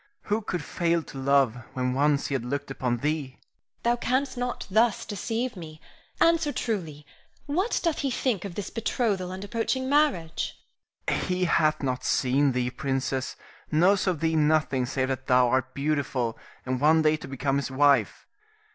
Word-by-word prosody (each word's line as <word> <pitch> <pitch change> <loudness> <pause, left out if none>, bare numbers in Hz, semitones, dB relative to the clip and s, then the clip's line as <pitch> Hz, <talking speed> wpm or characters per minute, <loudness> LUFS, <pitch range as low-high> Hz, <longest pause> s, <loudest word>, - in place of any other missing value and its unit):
Who 210 +2 0
could 180 -6 -3
fail 170 +1 0
to 135 - -9
love 135 -3 +3 0.2
when 125 0 -1
once 145 +1 +2
he - - -3
had 130 -3 -1
looked 140 +3 -4
upon 125 -2 -1
thee? 145 0 -2
Irene. - - -36 0.4
Thou 235 +1 +3
canst 260 +3 0
not 245 0 -3
thus 220 +1 +3
deceive 225 +4 -3
me. 160 -3 -9 0.4
Answer 330 -2 +3
truly: 165 - -3 0.4
What 360 +10 0
doth 335 -3 0
he 275 - 0
think 240 -6 -1
of 195 -4 -6
this 205 - -5
betrothal 210 -5 -1
and 190 +1 -6
approaching 230 +5 -1
marriage? 275 - +1 0.5
Rienzi. - - 0
He 180 0 +1
hath 155 -3 +2
not 130 -1 -1
seen 135 +1 +2
thee, 125 0 -1
princess, 135 -1 -2 0.4
knows 185 +6 +3
of 175 -5 0
thee 160 0 +1
nothing 150 -4 +2
save 130 0 -1
that 130 0 -3
thou 125 -1 +5
art 130 +1 0
beautiful, 140 -5 -1 0.3
and 130 0 -2
one 155 +2 +5
day 155 0 +4
to - - -9
become 135 +1 -1
his 140 - -2
wife. 135 -4 +2
155 Hz, 175 wpm, -26 LUFS, 135-205 Hz, 0.5 s, thou